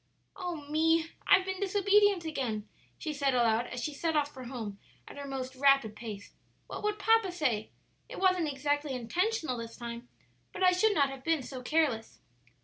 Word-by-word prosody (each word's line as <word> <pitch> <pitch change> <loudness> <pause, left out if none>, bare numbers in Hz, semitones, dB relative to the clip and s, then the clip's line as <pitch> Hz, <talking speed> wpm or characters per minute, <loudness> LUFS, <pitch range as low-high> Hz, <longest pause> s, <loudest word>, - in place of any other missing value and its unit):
"Oh 350 -6 -5
me! 325 +2 +2 0.2
I've 380 -1 +6
been 380 -1 -3
disobedient 400 -1 +3
again," 245 -9 -3 0.3
she 310 -3 -4
said 280 -2 +1
aloud, 235 0 +2
as 245 -1 -5
she 300 - -2
set 320 +3 -1
off 295 0 0
for 260 -1 -9
home 225 -5 -6 0.3
at - - -10
her 285 0 -7
most 265 -1 -5
rapid 275 -5 +4
pace; 210 -3 -8 0.3
"what - - -7
would 420 0 -1
papa 445 -2 +3
say? 255 -11 -1 0.4
It - - -8
wasn't 370 -5 +2
exactly 290 +1 -1
intentional 315 - -1
this 230 0 -7
time, 235 0 -7 0.4
but - - -3
I 365 - +7
should 410 +3 +3
not 280 -2 +3
have 270 -1 -9
been 325 -3 +1
so 255 0 -7
careless." 260 -5 0
290 Hz, 180 wpm, -30 LUFS, 250-360 Hz, 0.4 s, I